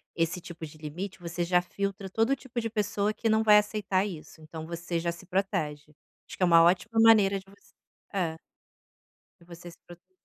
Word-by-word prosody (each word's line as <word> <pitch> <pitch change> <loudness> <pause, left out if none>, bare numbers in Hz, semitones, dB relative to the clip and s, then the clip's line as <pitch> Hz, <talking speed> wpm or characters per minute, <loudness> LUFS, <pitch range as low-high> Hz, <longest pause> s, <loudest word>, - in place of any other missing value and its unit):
esse 165 +2 0
tipo 170 -2 -9
de 155 0 -13
limite 170 +6 -6
você 175 0 -3
já 180 +1 +3
filtra 195 +1 -4
todo 225 +5 +1
o 275 - +3
tipo 250 -3 -5
de 225 - -3
pessoa 210 -1 -1
que 225 - -3
não 220 0 +3
vai 210 -1 +7
aceitar 205 -2 0
isso, 170 -4 -9
então 155 +1 -8
você 170 +1 -4
já 170 0 -1
se 170 +2 -12
protege, 155 -6 -2 0.3
acho - - -11
que - - -1
é - - +7
uma 165 -1 +6
ótima 185 +6 +2
maneira 210 -3 +6
de 190 - -17
você. 195 0 -22 0.4
É. 170 -5 -1 1.0
De - - -18
você 175 0 -11
se - - -18
proteger. 175 - -15
185 Hz, 205 wpm, -28 LUFS, 170-205 Hz, 1.0 s, vai